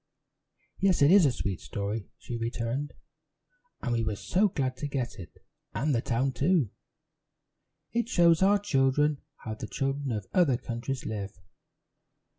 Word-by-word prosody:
"Yes, 190 -6 +3
it 145 - +6
is 190 -5 +7
a - - +2
sweet 100 -6 -3
story," 100 +1 -4
she 120 - -6
returned, 115 +4 -3 0.9
"and 125 - 0
we 115 -1 +1
were 110 -1 -1
so 190 - +2
glad 135 -8 -1
to 145 - -3
get 130 -6 -3
it, 85 - -9 0.4
and 150 +1 +1
the 115 - +1
town, 125 +4 0
too. 140 - +2 1.2
It 235 0 0
shows 170 -6 +5
our 200 +2 +5
children 145 -5 +2 0.2
how 110 - -3
the 110 - -6
children 135 0 -2
of 105 -4 -3
other 155 -9 +4
countries 120 +3 -4
live." 100 -3 -4
135 Hz, 150 wpm, -29 LUFS, 115-155 Hz, 1.2 s, is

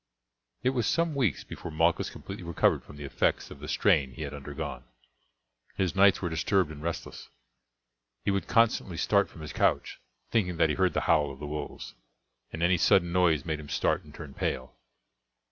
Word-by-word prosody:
It 130 - +3
was 120 -4 0
some 170 -1 +1
weeks 125 - 0
before - - -8
Malchus 80 +2 +1
completely 95 -1 -8
recovered 85 -1 +1
from - - -13
the 75 - -8
effects 70 - 0
of - - -10
the - - -8
strain 65 -2 +2
he 80 - -6
had 70 -1 -5
undergone. 75 +2 -6 0.9
His 95 -1 0
nights 100 0 +5
were 90 - 0
disturbed 80 +1 +1
and 75 -1 -9
restless. 85 +1 -5 1.0
He 100 - +2
would 100 0 -1
constantly 110 -6 +2
start 100 +3 +2
from 80 - -13
his 75 - -7
couch, - - 0 0.3
thinking 90 -6 +1
that 80 - +3
he 75 - 0
heard 95 -1 +2
the - - 0
howl 75 -3 +3
of 70 - -9
the 75 - -7
wolves, 75 0 -6 0.6
and 80 - -4
any 90 +1 +4
sudden 85 +2 +4
noise 85 -6 +3
made 80 -2 -2
him 75 -1 -10
start - - +1
and 75 - -15
turn 75 -2 -10
pale. 65 -1 -3
85 Hz, 190 wpm, -28 LUFS, 75-95 Hz, 1.0 s, nights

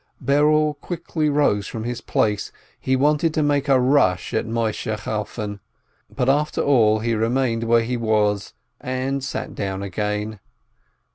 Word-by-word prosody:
Berel 150 +2 +3
quickly 165 -3 -2
rose 140 -9 +2
from 110 - -5
his 120 0 -4
place, 105 -1 0 0.3
he 130 - +1
wanted 150 +4 +2
to 155 - +2
make 145 -1 +1
a 135 -1 +5
rush 125 -8 +2
at - - 0
Moisheh 110 -1 -2
Chalfon. 105 -1 -4 0.5
But 125 -2 -2
after 145 +3 +1
all 110 -6 +3
he 115 +1 0
remained 115 +1 0
where 115 0 +4
he 125 +2 -2
was, 105 -3 0 0.2
and 130 +2 -2
sat 130 - -4
down 95 -1 -3
again. 105 +2 -3
120 Hz, 145 wpm, -22 LUFS, 105-140 Hz, 0.5 s, a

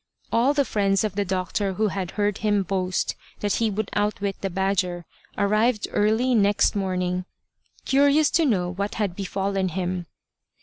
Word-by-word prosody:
All 255 +5 +3
the 285 -1 +3
friends 195 -3 +1
of 215 -3 -1
the 205 +1 0
doctor 190 +1 -1
who 215 +3 +1
had 190 -2 -3
heard 205 -1 0
him 205 -2 +1
boast 185 -1 -1 0.3
that 205 -1 0
he 225 -1 +1
would 210 0 -3
outwit 205 -1 -1
the 195 - -1
badger, 185 -2 -1 0.3
arrived 215 +2 +2
early 220 +5 +2
next 205 -2 +3
morning, 180 -2 -1 0.6
curious 285 +2 +4
to 330 - +3
know 190 -10 +1
what 200 +2 -3
had 200 -5 -1
befallen 195 0 -1
him. 180 0 -3
200 Hz, 160 wpm, -24 LUFS, 185-215 Hz, 0.6 s, curious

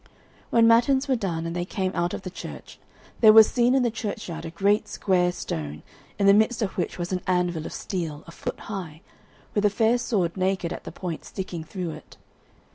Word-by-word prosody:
When 230 -1 +5
matins 255 +4 +4
were 265 - +2
done 170 -7 -2
and 165 +1 -4
they 175 - -1
came 185 +1 -2
out 175 0 -1
of - - -8
the 185 - -6
church, - - -9 0.4
there 220 -2 +8
was 220 0 +9
seen 245 +1 +2
in 265 - +3
the 240 - +1
churchyard 200 -7 -5
a - - -4
great 200 +5 +1
square 180 -3 +1
stone, 75 - -5 0.3
in 200 - +1
the 200 - +8
midst 220 +2 +3
of 195 - -3
which 180 - -2
was 175 0 -4
an 185 -1 -1
anvil 175 -3 0
of - - -8
steel, 165 -6 -4
a 170 - -11
foot - - -6
high, 175 -6 -6 0.5
with 205 - +1
a 210 - +5
fair 225 +3 +2
sword 185 -8 0
naked 185 -2 0
at - - -9
the - - -6
point 170 -1 -5
sticking 185 -4 -6
through 175 0 -5
it. - - -12
190 Hz, 210 wpm, -25 LUFS, 175-215 Hz, 0.5 s, was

